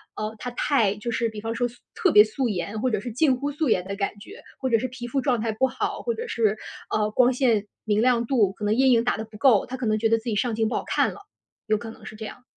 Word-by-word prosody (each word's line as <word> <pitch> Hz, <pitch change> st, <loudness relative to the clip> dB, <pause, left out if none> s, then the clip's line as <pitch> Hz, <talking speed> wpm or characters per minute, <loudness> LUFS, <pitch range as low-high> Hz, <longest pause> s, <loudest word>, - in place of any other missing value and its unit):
哦， 215 Hz, +1 st, -4 dB
她 250 Hz, -, -5 dB
太 235 Hz, -5 st, +1 dB
就 210 Hz, +3 st, -5 dB
是 230 Hz, 0 st, 0 dB
比 215 Hz, -1 st, -8 dB
方 225 Hz, +1 st, -3 dB
说 245 Hz, +1 st, +1 dB
素 240 Hz, 0 st, -16 dB, 0.2 s
特 395 Hz, -6 st, +2 dB
别 210 Hz, -, +9 dB
素 230 Hz, +3 st, -2 dB
颜， 200 Hz, +3 st, -3 dB
或 255 Hz, -, +2 dB
者 215 Hz, -4 st, 0 dB
是 240 Hz, +3 st, -6 dB
近 265 Hz, +3 st, +3 dB
乎 285 Hz, +3 st, -3 dB
素 295 Hz, -1 st, -1 dB
颜 185 Hz, -4 st, +2 dB
的 200 Hz, +1 st, -4 dB
感 200 Hz, 0 st, -1 dB
觉， 395 Hz, -, -12 dB, 0.2 s
或 260 Hz, -, -1 dB
者 230 Hz, -, +4 dB
是 255 Hz, -, -2 dB
皮 245 Hz, -1 st, -8 dB
肤 265 Hz, +2 st, -1 dB
状 250 Hz, -4 st, +1 dB
态 225 Hz, 0 st, -1 dB
不 240 Hz, +5 st, +1 dB
好。 260 Hz, 0 st, -3 dB
或 470 Hz, -, -1 dB
者 470 Hz, +1 st, -5 dB
是， 215 Hz, -2 st, +1 dB, 0.3 s
呃， 210 Hz, 0 st, +1 dB
光 250 Hz, +3 st, +4 dB
线 230 Hz, -5 st, +1 dB, 0.2 s
明 215 Hz, 0 st, +2 dB
亮 240 Hz, -1 st, +3 dB
度， 225 Hz, -7 st, +2 dB
可 210 Hz, -, -6 dB
能 210 Hz, -, +2 dB
阴 265 Hz, +1 st, +4 dB
影 230 Hz, -1 st, +4 dB
打 245 Hz, -, 0 dB
得 220 Hz, -, -4 dB
不 220 Hz, -1 st, -13 dB
够， 230 Hz, -4 st, +4 dB
她 260 Hz, -, -6 dB
可 250 Hz, -, -4 dB
能 215 Hz, -1 st, +2 dB
觉 225 Hz, 0 st, +2 dB
得 225 Hz, -, +4 dB
自 225 Hz, -, -10 dB
己 230 Hz, -3 st, -1 dB
上 230 Hz, +2 st, 0 dB
镜 220 Hz, 0 st, +1 dB
不 225 Hz, -, -2 dB
好 -, -, -1 dB
看 -, -, +1 dB
了， -, -, -12 dB, 0.5 s
有 215 Hz, -1 st, +2 dB
可 225 Hz, +1 st, -8 dB
能 220 Hz, -, -15 dB
是 215 Hz, -, -9 dB
这 220 Hz, -, -7 dB
样。 245 Hz, -, -10 dB
230 Hz, 325 characters per minute, -25 LUFS, 215-255 Hz, 0.5 s, 别